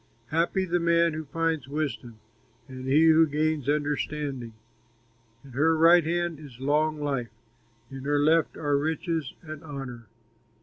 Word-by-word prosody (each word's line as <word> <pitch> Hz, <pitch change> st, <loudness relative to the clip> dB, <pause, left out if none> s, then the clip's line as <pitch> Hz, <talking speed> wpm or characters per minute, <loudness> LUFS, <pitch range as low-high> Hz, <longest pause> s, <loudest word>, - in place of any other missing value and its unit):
Happy 170 Hz, +4 st, +1 dB
the 175 Hz, 0 st, 0 dB
man 170 Hz, -1 st, +3 dB
who 155 Hz, 0 st, -5 dB
finds 165 Hz, -2 st, -1 dB
wisdom, 140 Hz, -5 st, -4 dB, 0.5 s
And 130 Hz, 0 st, -8 dB
he 150 Hz, +4 st, +5 dB
who 160 Hz, 0 st, +6 dB
gains 150 Hz, -1 st, -1 dB
understanding. 145 Hz, -4 st, -2 dB, 0.9 s
In 135 Hz, -, -13 dB
her 160 Hz, +6 st, +2 dB
right 170 Hz, +2 st, +6 dB
hand 170 Hz, -1 st, -1 dB
is 135 Hz, -6 st, -12 dB
long 150 Hz, +3 st, +1 dB
life, 135 Hz, -5 st, -2 dB, 0.6 s
In 135 Hz, 0 st, -8 dB
her 145 Hz, 0 st, +1 dB
left 155 Hz, +3 st, +2 dB
are 145 Hz, -2 st, +1 dB
riches 160 Hz, -1 st, -2 dB
and 155 Hz, -2 st, -9 dB
honor. 135 Hz, -6 st, -8 dB
150 Hz, 140 wpm, -27 LUFS, 140-160 Hz, 0.9 s, who